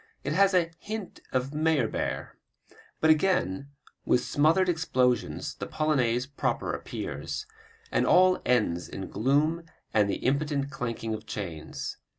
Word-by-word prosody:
It 140 - -1
has 195 +2 +4
a 170 -2 +3
hint 215 -2 -6
of 130 +2 -1
Meyerbeer. 155 -6 0 0.7
But 160 - +6
again 155 - +1 0.3
with 125 - +2
smothered 160 +6 +3
explosions 130 -8 +1
the - - -6
Polonaise 125 -6 +1
proper 140 0 -2
appears, 430 - -5 0.5
and - - +2
all 185 0 +5
ends 105 -9 +1
in 95 - -6
gloom 145 +7 +2 0.3
and 105 -2 +3
the - - +1
impotent 140 +1 0
clanking 115 -3 -3
of 110 0 -6
chains. 80 -7 -5
140 Hz, 130 wpm, -28 LUFS, 115-160 Hz, 0.7 s, But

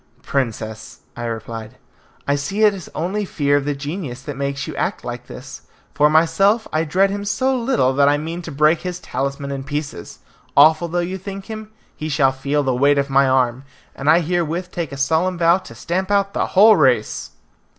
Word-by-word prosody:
"Princess," 110 -5 -3
I 120 - -5
replied, 115 -1 -6 0.5
"I 140 - +3
see 145 +10 -1
it 210 -1 +6
is 190 -4 -9
only 190 +6 -1
fear 145 -7 0
of 145 -1 +1
the 145 -1 -1
genius 140 -3 -6
that 145 -1 -6
makes 140 0 -3
you - - -7
act - - -2
like - - -6
this. - - -10 0.3
For 150 +1 +4
myself, 170 +8 +3
I 160 +1 +1
dread 190 +5 +2
him 200 0 -3
so 260 +6 0
little 235 - +1
that 140 +1 +4
I 145 - +3
mean 165 +3 -5
to 170 - -8
break 155 +3 +3
his 180 -1 -4
talisman 140 0 -4
in 135 -1 -4
pieces! 145 +1 -5 0.4
Awful 155 +3 +6
though 170 +1 -3
you 190 +2 -5
think 195 +1 -7
him, 215 -1 -7 0.3
he 155 - -5
shall 140 -3 +3
feel 140 +2 -1
the 130 -2 +1
weight 140 +3 +3
of 140 0 0
my 135 0 +4
arm, 130 -1 +1 0.3
and 140 +2 -1
I 165 +3 +6
herewith 175 +1 -2
take 170 -5 -4
a 140 - -6
solemn 160 +6 +1
vow 170 +2 +4
to 115 - -13
stamp 180 - -2
out 200 -1 +1
the - - 0
whole 215 +3 +6
race." 125 - +1
150 Hz, 200 wpm, -20 LUFS, 140-185 Hz, 0.5 s, it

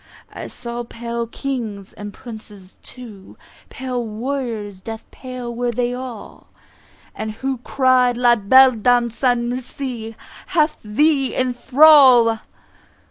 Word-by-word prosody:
I - - -7
saw 240 0 -7
pale 235 0 -5
Kings, 225 -7 -5
and 205 0 -8
Princes 210 -5 -12
too, 215 -7 -13 0.3
Pale 255 -2 -4
warriors, 225 -3 -5
death 225 +2 -7
pale 255 -2 -7
were 245 +1 -2
they 245 +1 -1
all; 250 -3 -9 0.9
Who 265 -1 -2
cry'd 255 -1 +2
"La 240 -1 +4
belle 260 +5 +6
Dame 240 +1 +2
sans 240 0 0
merci 245 -2 -6 0.3
Hath 305 -2 +1
thee 275 +5 +1
in 255 -1 0
thrall!" 255 -4 +6
245 Hz, 115 wpm, -20 LUFS, 225-260 Hz, 0.9 s, belle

